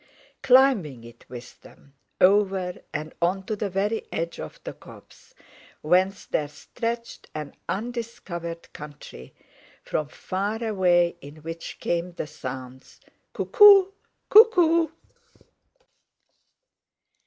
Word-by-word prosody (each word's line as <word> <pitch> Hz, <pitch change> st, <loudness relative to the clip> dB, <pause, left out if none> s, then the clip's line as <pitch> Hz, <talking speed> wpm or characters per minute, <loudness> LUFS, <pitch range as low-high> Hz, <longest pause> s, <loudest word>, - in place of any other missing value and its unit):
Climbing 245 Hz, -, +4 dB
it 115 Hz, 0 st, -15 dB
with 120 Hz, -1 st, -11 dB
them, 140 Hz, -, -19 dB, 0.3 s
over, 190 Hz, -2 st, +2 dB
and 155 Hz, +1 st, -5 dB
on 185 Hz, +3 st, 0 dB
to 220 Hz, -, -2 dB
the 205 Hz, -1 st, -3 dB
very 205 Hz, +4 st, -2 dB
edge 165 Hz, +1 st, -4 dB
of -, -, -8 dB
the -, -, -6 dB
copse, -, -, -17 dB, 0.5 s
whence 185 Hz, +5 st, +1 dB
there 150 Hz, -, -1 dB
stretched 235 Hz, -, -6 dB
an 150 Hz, -2 st, -6 dB, 0.2 s
undiscovered 195 Hz, -7 st, -5 dB
country, 145 Hz, -, -11 dB, 0.5 s
from 150 Hz, -, -2 dB
far 200 Hz, +8 st, -4 dB
away 180 Hz, -5 st, +2 dB
in 145 Hz, +2 st, -13 dB
which 165 Hz, +1 st, -7 dB
came 175 Hz, +1 st, -2 dB
the 170 Hz, -, -5 dB
sounds, 130 Hz, -2 st, -9 dB, 0.3 s
"Cuckoo 405 Hz, -5 st, +7 dB, 0.4 s
cuckoo!" 350 Hz, -7 st, +6 dB
180 Hz, 105 wpm, -25 LUFS, 155-225 Hz, 0.5 s, Cuckoo